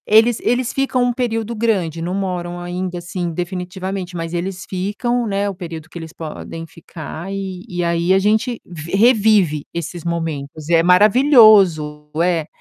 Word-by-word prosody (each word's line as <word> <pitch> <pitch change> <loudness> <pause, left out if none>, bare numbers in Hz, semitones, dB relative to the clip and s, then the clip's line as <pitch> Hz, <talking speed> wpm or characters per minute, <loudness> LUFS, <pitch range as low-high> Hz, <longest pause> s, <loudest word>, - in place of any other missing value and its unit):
Eles 225 +2 +5
eles 245 0 0
ficam 270 -2 +1
um 245 0 +1
período 230 -2 -2
grande, 190 -8 0
não 175 +3 -2
moram 175 -3 -3
ainda 180 +1 -4
assim 175 0 -4
definitivamente, 180 +1 -5
mas 165 0 -4
eles 180 +2 -4
ficam, 210 +6 -1
né, 200 0 0
o 200 - -2
período 165 -3 -8
que 175 - -10
eles 160 -1 -8
podem 165 0 -7
ficar, 165 +2 -9
e 190 -2 -5
e 175 -1 -2
aí, 170 +1 +1
a - - +5
gente 220 +4 +1
vi 170 -2 -9
revive 210 - +4
esses 170 0 -5
momentos. 155 -3 -4
É 165 -1 +5
maravilhoso, 195 - +5
é, 170 -3 0
180 Hz, 155 wpm, -19 LUFS, 170-210 Hz, -, Eles